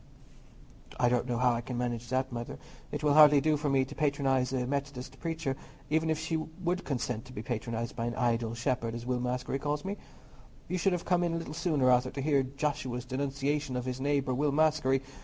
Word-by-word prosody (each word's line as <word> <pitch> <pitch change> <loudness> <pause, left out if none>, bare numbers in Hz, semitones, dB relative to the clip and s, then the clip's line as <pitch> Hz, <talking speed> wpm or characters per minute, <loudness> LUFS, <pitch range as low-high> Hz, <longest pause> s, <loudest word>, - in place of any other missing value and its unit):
"I 125 - +4
don't 125 0 +1
know 120 -1 0
how 125 0 +4
I 115 - -1
can 120 +1 -5
manage 120 -1 -2
that, 130 +1 0
Mother; 120 -1 -5 0.3
it - - -4
will 150 -1 +4
hardly 150 -1 +8
do 155 +2 +2
for 150 0 -1
me 135 -1 +3
to - - -9
patronize 135 -4 +1
a 130 -2 0
Methodist 135 -1 -4
preacher, 165 -4 -2 0.4
even 160 +1 +2
if 160 - +2
she 160 +1 -1
would 175 +3 -3
consent 125 -5 -2
to 130 - -12
be 110 - -5
patronized 115 -1 -3
by 115 -1 -2
an 120 - -3
idle 115 -2 0
shepherd, 115 -1 -1
as 120 0 -6
Will 125 0 0
Maskery 125 +2 -2
calls 145 +2 -2
me. 200 +2 -3 0.7
You 185 - -1
should 195 +1 +3
have 175 - -2
come 180 -1 +3
in 170 -1 0
a - - 0
little 165 -3 -5
sooner, 155 -6 +2
Arthur, 125 +1 +4
to 140 - -5
hear 145 -2 +3
Joshua's 135 -2 -2
denunciation 140 +1 -1
of 125 0 -2
his 130 0 -3
neighbour 140 -2 +1
Will 145 +3 +1
Maskery. 145 -3 +3
135 Hz, 215 wpm, -30 LUFS, 125-150 Hz, 0.7 s, hardly